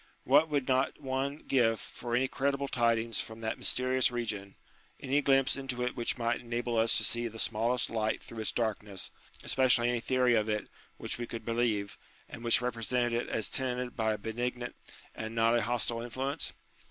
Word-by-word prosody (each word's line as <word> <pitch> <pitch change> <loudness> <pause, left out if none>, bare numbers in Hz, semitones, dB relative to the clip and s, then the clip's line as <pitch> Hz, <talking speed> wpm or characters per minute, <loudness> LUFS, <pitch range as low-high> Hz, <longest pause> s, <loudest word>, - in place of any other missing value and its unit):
What 145 +5 +5
would 145 -3 0
not 130 0 +1
one 140 +1 -2
give 115 -4 +3
for 120 -1 -4
any 130 +2 +3
credible 140 +1 -1
tidings 115 -2 +2
from 110 0 -9
that 110 0 -2
mysterious 130 0 +2
region, 105 -5 -4 0.4
any 140 +2 +1
glimpse 135 -1 +4
into 130 -3 -3
it 125 - -2
which 120 0 -1
might 120 0 0
enable 120 0 -2
us 115 +1 +4
to - - +1
gee 120 0 +1
the 115 0 -9
smallest 115 +2 +1
light 110 -1 -1
through 115 - -9
its 110 - 0
darkness, 105 -4 -2 0.3
especially 125 -2 +4
any 120 - 0
theory 125 +1 +2
of 110 -1 +2
it 105 -1 -1 0.3
which - - -4
we 120 - -3
could 115 - -7
believe, 115 -4 0 0.3
and 115 - -9
which 120 +1 +4
represented 120 0 0
it - - -8
as 110 - 0
tenanted 125 -1 -2
by 110 -1 +1
a - - -3
benignant 120 +3 -3 0.4
and 110 +1 -6
not 115 +1 +4
a 120 - +3
hostile 115 0 0
influence 130 +4 -3
120 Hz, 185 wpm, -31 LUFS, 115-130 Hz, 0.4 s, What